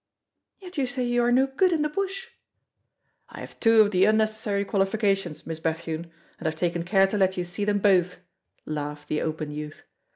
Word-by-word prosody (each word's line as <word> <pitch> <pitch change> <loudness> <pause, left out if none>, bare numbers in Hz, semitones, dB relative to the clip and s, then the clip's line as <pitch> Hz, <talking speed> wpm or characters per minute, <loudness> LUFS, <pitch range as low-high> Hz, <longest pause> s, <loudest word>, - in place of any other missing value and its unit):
"Yet 365 -4 -8
you 265 - +1
say 250 +1 -2
you 240 0 +1
are 240 - +2
no 260 +2 +4
good 280 +8 +1
in 315 -3 +1
the - - +1
bush!" 395 +7 -4 1.0
"I - - -10
have - - -11
two 225 -1 +6
of 205 -1 +3
the 185 -1 +4
unnecessary 215 -1 +1
qualifications, 195 -4 0
Miss 160 -1 -5
Bethune, 160 +1 -3 0.3
and 160 - -3
I've 155 - -1
taken 170 +1 -1
care 195 +3 +3
to 205 +2 -2
let 190 -1 +2
you 180 - 0
see 180 +4 -4
them 205 0 +1
both," 185 -3 +2 0.5
laughed 150 -1 -5
the 155 - 0
open 155 -1 -3
youth. 150 +1 -7
195 Hz, 195 wpm, -25 LUFS, 165-240 Hz, 1.0 s, two